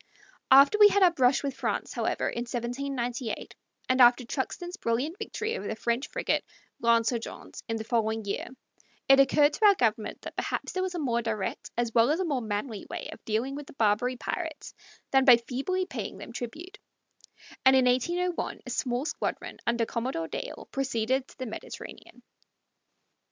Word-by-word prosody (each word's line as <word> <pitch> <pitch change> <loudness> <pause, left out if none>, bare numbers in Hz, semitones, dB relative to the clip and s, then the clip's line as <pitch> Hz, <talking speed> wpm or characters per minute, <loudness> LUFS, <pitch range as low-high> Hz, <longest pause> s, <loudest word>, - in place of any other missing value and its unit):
After 275 +10 +7
we 415 - +10
had 405 -1 +3
our 360 - +7
brush 260 -4 +3
with 280 -1 -2
France, - - -2
however, - - -1
in - - -3
1798, 245 0 -3 0.3
and 255 0 +3
after 245 +1 +6
Truxtun's 350 +8 -4
brilliant 270 - -1
victory 440 +1 -3
over - - -5
the - - -3
French 235 +4 -1
frigate - - -1 0.4
L'Insurgente 230 0 0
in 225 - -1
the 220 - -4
following 220 -1 0
year, 200 - -3 0.6
it 270 0 +7
occurred 290 +2 +5
to 430 - +1
our 400 - +6
government 225 - 0
that - - -8
perhaps - - -3
there 370 - -2
was 370 -1 -2
a - - -2
more 240 -5 0
direct 215 -4 -3
as 235 -1 0
well 230 +1 +5
as 310 +4 +1
a 375 - 0
more 280 -6 -1
manly 215 0 -4
way - - -5
of - - -15
dealing 225 +5 -1
with 285 0 -7
the - - -12
Barbary 230 +2 +1
pirates 320 +3 -5 0.4
than 270 -1 +5
by 250 -3 +8
feebly 275 +11 -2
paying - - -6
them 235 - -9
tribute, 335 - -7 0.8
and 265 0 +7
in 260 -1 +5
1801 345 +8 0
a - - -7
small 245 +2 -1
squadron, - - -4
under 235 -1 +2
Commodore 230 -9 -3
Dale, - - -6
proceeded 260 -1 0
to - - -18
the 260 - -4
Mediterranean. 220 - -9
255 Hz, 175 wpm, -28 LUFS, 235-295 Hz, 0.8 s, we